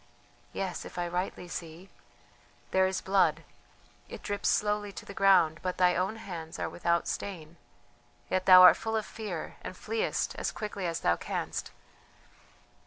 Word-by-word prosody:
Yes, 190 -2 -4
if - - -11
I 175 0 -1
rightly 180 +1 -3
see... 170 +2 -8 0.8
there 190 0 +4
is 190 0 -2
blood, 195 0 +2 0.7
it - - -9
drips 205 -1 -1
slowly 210 -1 0
to - - -9
the 200 - -9
ground, 190 -5 +4
but 185 -1 -3
thy 180 -1 +4
own 185 +5 0
hands 175 -7 -7
are - - -2
without 170 -1 0
stain, 170 -4 -5 0.7
yet 185 0 -1
thou 185 -1 +10
art 180 - +9
full 225 0 -3
of 215 - -2
fear 205 -8 -6
and - - -8
fleest 455 +2 -2
as - - -1
quickly 205 -4 -4
as 165 -1 -3
thou 85 0 +2
canst. - - -4
185 Hz, 160 wpm, -29 LUFS, 175-200 Hz, 0.8 s, thou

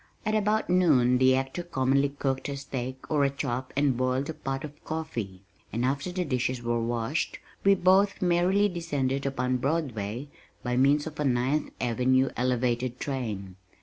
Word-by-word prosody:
At 215 - 0
about 215 0 +1
noon 140 -9 +4
the 130 0 +5
actor 135 +6 -2
commonly 140 -4 +1
cooked 135 -1 -2
a 140 - -3
steak 130 -1 -6
or 150 -2 +3
a 140 - +4
chop 130 -2 -3
and 140 -2 +3
boiled 130 +4 0
a - - -7
pot 135 -2 -4
of 150 0 -9
coffee, 115 -13 -5 0.3
and 120 +3 -1
after 140 +7 -1
the 180 0 -2
dishes 125 -3 -1
were 120 0 0
washed, 120 +5 -1 0.3
we 200 0 +6
both 190 +2 +3
merrily 180 +3 +3
descended 140 -7 -1
upon 130 -1 0
Broadway 125 -4 -2 0.4
by 125 0 -1
means 140 +3 +3
of 155 -1 -8
a - - +1
Ninth 130 +3 +1
Avenue 130 +2 +2
elevated 125 0 0
train. 105 -9 -4
135 Hz, 165 wpm, -28 LUFS, 125-155 Hz, 0.4 s, we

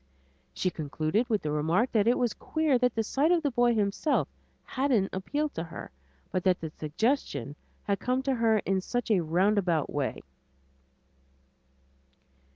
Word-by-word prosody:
She 185 - -1
concluded 155 - -1
with 215 -3 0
the 150 - -1
remark 165 - +1
that 215 -1 +2
it 240 - +4
was 240 -3 +1
queer 310 -5 0
that 250 -1 +1
the 225 - +1
sight 285 +9 +1
of 345 -2 +3
the 285 - +1
boy 240 -1 +3
himself 210 +8 +1 0.4
hadn't 255 -8 0
appealed 290 +11 -2
to 165 - -3
her, 165 - -9 0.4
but 185 - -1
that 185 -2 +3
the 160 -1 -6
suggestion 155 - -2 0.3
had 200 -1 -1
come 255 +1 0
to 270 0 +1
her 230 -3 +3
in 190 -1 +1
such 245 +4 -2
a 200 - +4
roundabout 175 -1 +1
way. 145 -3 -2
210 Hz, 160 wpm, -28 LUFS, 170-250 Hz, 0.4 s, it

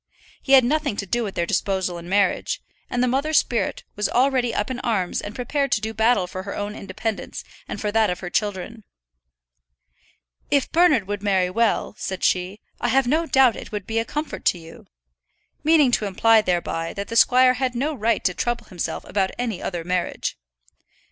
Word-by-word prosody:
He 275 - 0
had 265 -1 +8
nothing 295 -3 0
to 200 - -3
do 235 +5 -1
with 200 -3 -5
their 170 - 0
disposal 185 -1 -1
in 170 +1 -10
marriage; 200 -1 +1 0.3
and 245 0 0
the - - +2
mother's 280 +5 +1
spirit 235 - 0
was 210 0 0
already 255 -1 +2
up 225 +2 -2
in 250 - -4
arms 200 -8 -1
and 205 +2 -7
prepared 275 +2 -1
to - - +2
do 220 +1 -4
battle 220 -2 +3
for 185 +1 -6
her 200 +1 -6
own 205 0 -4
independence, 200 +2 -5 0.2
and - - -5
for 210 - -2
that 220 0 +3
of 180 - -3
her 180 -1 -6
children. 210 +2 -2 1.7
"If 280 -2 +1
Bernard 335 - +4
would 205 -1 -3
marry 190 -3 +1
well," 230 +2 +1
said 190 -1 -4
she, 185 +3 0 0.2
"I - - 0
have 265 +2 +3
no 315 +6 +1
doubt 265 -6 +4
it - - -9
would 205 -3 -4
be 225 0 -1
a - - +1
comfort 300 +6 -5
to - - +3
you," 165 -1 -13 0.8
meaning 305 -4 +5
to 215 -3 +1
imply 220 +3 +4
thereby 170 -3 -2
that 200 0 -5
the 230 - -4
squire 255 +2 +6
had 255 -1 -2
no 285 +6 -1
right 230 -3 0
to 180 - +1
trouble 240 +5 -2
himself 175 -3 -4
about 190 -1 0
any 230 -6 -3
other 175 -3 -4
marriage. 180 0 -2
220 Hz, 195 wpm, -23 LUFS, 190-250 Hz, 1.7 s, had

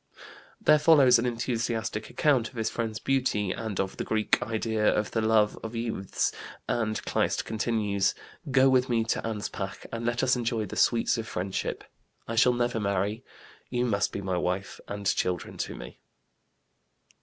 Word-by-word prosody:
There 150 - +5
follows 145 -6 +6
an 120 - 0
enthusiastic 115 -2 -2
account 130 -7 +2
of - - -20
his 110 -2 -1
friend's 110 -2 -3
beauty 115 -7 0
and 110 -1 -4
of 95 0 -2
the - - -2
Greek 110 -1 +1
"idea 110 -1 -1
of 105 - -1
the 115 - 0
love 110 -1 +3
of 115 +1 -6
youths," 115 -5 -1 0.4
and 110 -2 0
Kleist - - 0
concludes: 105 -3 0 0.3
"Go 135 0 +5
with 130 0 +3
me 115 -2 +2
to 110 - -1
Anspach, 105 -3 -5
and 115 0 -4
let 120 +1 0
us 130 0 +4
enjoy 115 -2 -1
the 95 - -7
sweets 115 0 +2
of 115 - -5
friendship.... 95 0 -3 0.4
I 115 - -3
shall 125 +2 +5
never 120 -1 0
marry; 100 +3 -1 0.5
you 125 0 0
must 100 -4 +1
be 100 - -4
wife 95 +1 -2
and 100 0 -6
children 90 -2 -1
to - - -3
me." - - -10
115 Hz, 165 wpm, -28 LUFS, 105-120 Hz, 0.5 s, follows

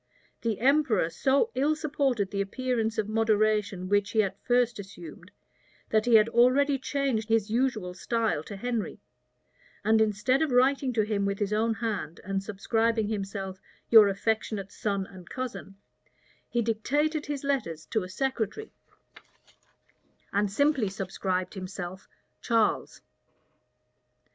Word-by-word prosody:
The 225 -3 -1
emperor 255 - +3
so 280 - +2
ill 295 +4 +2
supported 275 -9 -1
the 200 - -1
appearance 225 +1 -1
of 215 -2 0
moderation 215 -3 +1
which 205 +1 +2
he 220 -1 +4
at 195 -1 -5
first 245 -2 +2
assumed, 180 -3 -10 0.6
that 215 0 +3
he 235 - +6
had 215 0 +6
already 265 +4 +4
changed 265 -5 -1
his 225 -2 +1
usual 225 -7 0
style 225 -2 -1
to 205 - -7
Henry; 235 0 -3 0.9
and 220 +1 +4
instead 220 +6 +2
of 315 - +2
writing 260 +1 +3
to 220 -2 +2
him 210 -1 -1
with 200 0 -1
his 205 0 -1
own 225 +1 +1
hand, 205 -8 -3
and 195 +1 -2
subscribing 220 +2 0
himself 195 -2 -4 0.3
"Your 220 -3 +9
affectionate 200 0 -2
son 200 -2 -2
and 185 -3 -13
cousin," 250 -6 -6 0.7
he 240 -1 0
dictated 290 +8 0
his 290 -1 -4
letters 170 - -2
to 220 - +1
a 180 - -7
secretary, 265 - -3 1.6
and 205 0 +1
simply 280 -2 +2
subscribed 185 -1 -3
himself 185 -1 -7 0.3
"Charles." 225 -2 0
220 Hz, 135 wpm, -28 LUFS, 195-250 Hz, 1.6 s, Your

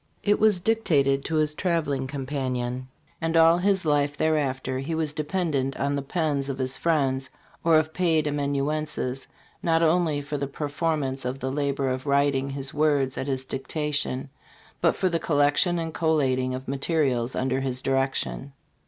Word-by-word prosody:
It 205 0 +3
was 215 -4 +4
dictated 150 -10 +2
to 160 - -1
his 155 -1 +2
traveling 150 -7 -1
companion; 130 -2 -3 0.3
and 165 0 +1
all 165 +1 +6
his 190 -1 +1
life 145 -1 +1
thereafter 135 -4 0
he 145 +5 -3
was 155 -2 -1
dependent 150 -4 -1
on 140 +1 0
the 140 - -1
pens 140 -2 -1
of 135 - -3
his 130 0 -2
friends 135 -5 0 0.3
or 165 -1 +5
of 155 0 0
paid 165 -4 +2
amanuenses 145 -2 -1 0.3
not 165 -1 +2
only 160 -2 +2
for 145 +1 -4
the 140 - -2
performance 145 -1 -2
of 125 +1 -3
the 130 -1 -3
labor 140 -1 -1
of 130 +2 -2
writing 140 -1 +2
his 135 0 -4
words 145 -3 +2
at 135 - -4
his 130 -1 -2
dictation, 140 0 -2 0.5
but - - +3
for 190 - +1
the 170 -2 0
collection 145 +4 +2
and 165 -1 -3
collating 130 -6 +1
of 130 +1 -7
materials 135 -3 0
under 130 0 0
his 130 -2 -2
direction. 135 +1 -1
145 Hz, 160 wpm, -26 LUFS, 135-160 Hz, 0.5 s, all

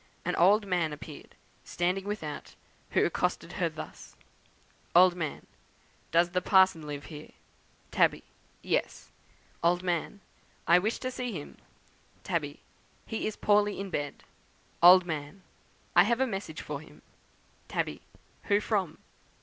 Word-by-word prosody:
An - - 0
old 205 +5 +5
man 175 -5 0
appeared, 150 - -11 0.3
standing 180 +2 -1
without, 180 -8 -5 0.3
who - - +3
accosted - - -1
her - - 0
thus: - - -10 0.8
"Old 180 +1 +8
Man. 160 -4 -4 0.6
'Does 170 +1 +3
the 180 0 0
parson 185 -5 +4
live 145 -1 -6
here?' 150 -1 -10 0.6
"Tabby. - - +2 0.4
'Yes.' - - -2 0.5
"Old 175 +2 +2
Man. 175 +3 -2 0.5
'I 175 +1 +6
wish 215 +5 -1
to 255 - -2
see 250 -2 -4
him.' 150 -5 -8 0.6
"Tabby. - - -3 0.4
'He 225 - -3
is 215 - -4
poorly 205 -1 +2
in 195 -1 -5
bed.' 145 -3 -4 0.6
"Old 180 +1 +9
Man. 155 +2 -5 0.5
'I 175 - +8
have 235 +3 +1
a 265 - +3
message 195 -9 -5
for 145 -1 -5
him.' 155 - -17 0.6
"Tabby. - - -2 0.4
'Who 205 -1 +3
from?' 200 -6 -1
180 Hz, 135 wpm, -29 LUFS, 160-205 Hz, 0.8 s, Old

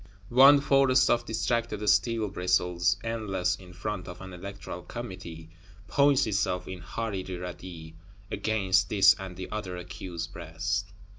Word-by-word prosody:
One 135 +3 +8
forest 135 -2 +4
of 120 0 +2
distracted 110 -1 -1
steel 110 +2 +3
bristles, 90 0 +1
endless, 95 -5 -1
in 90 -2 -14
front 90 +1 -5
of 90 0 -8
an 95 -1 -9
Electoral 95 0 -7
Committee; 90 -8 -8 0.4
points 140 +1 +4
itself, 95 -4 -1
in 95 -1 -6
horrid 95 0 -4
radii, 90 -2 -7 0.4
against 95 -4 +1
this 95 -2 +6
and 95 -2 -7
the 95 - -7
other 100 -4 -4
accused 90 0 -6
breast. 85 +4 -3
95 Hz, 135 wpm, -28 LUFS, 90-110 Hz, 0.4 s, One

